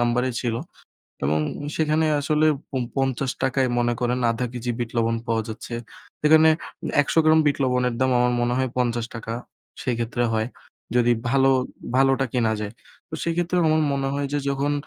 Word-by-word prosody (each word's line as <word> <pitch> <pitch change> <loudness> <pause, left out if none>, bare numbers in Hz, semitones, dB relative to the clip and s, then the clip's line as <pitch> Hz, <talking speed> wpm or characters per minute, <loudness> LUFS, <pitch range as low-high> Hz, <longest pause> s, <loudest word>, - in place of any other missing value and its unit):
নাম্বারে 120 +2 +1
ছিল। 120 -3 -1 0.7
এবং 75 +2 +2 0.4
সেখানে 155 0 +2 0.2
আসলে 155 +1 +2 0.3
উম 125 - 0
৫০ 135 -1 0
টাকায় 130 0 +2
মনে 120 0 +2
করেন 125 0 0
আধা 115 +2 -1
কেজি 120 0 -3
বিট 120 -2 -3
লবণ 115 0 +2
পাওয়া 115 -1 +1
যাচ্ছে। 110 +2 -6 0.5
সেখানে 160 +1 +6 0.5
১০০ - - -3
গ্রাম 155 0 +6
বিট 145 - +3
লবণের 125 -1 +1
দাম 130 0 +3
আমার 125 0 +3
মনে 120 0 +1
হয় 130 0 +1
৫০ 120 -2 -2 0.5
সেক্ষেত্রে 120 0 -1
হয়, 110 0 0 0.5
যদি 120 0 +4 0.2
ভালো 135 +1 +4 0.5
ভালোটা 135 0 +3
কেনা 115 -3 +2
যায়। 105 -1 -4 0.4
তো 160 - -7
সেক্ষেত্রে 170 +1 0
আমার 155 0 +3
মনে 135 -1 -1
হয় 140 0 -1
যে 145 - +1
যখন 140 +1 0
125 Hz, 160 wpm, -24 LUFS, 120-140 Hz, 0.7 s, সেখানে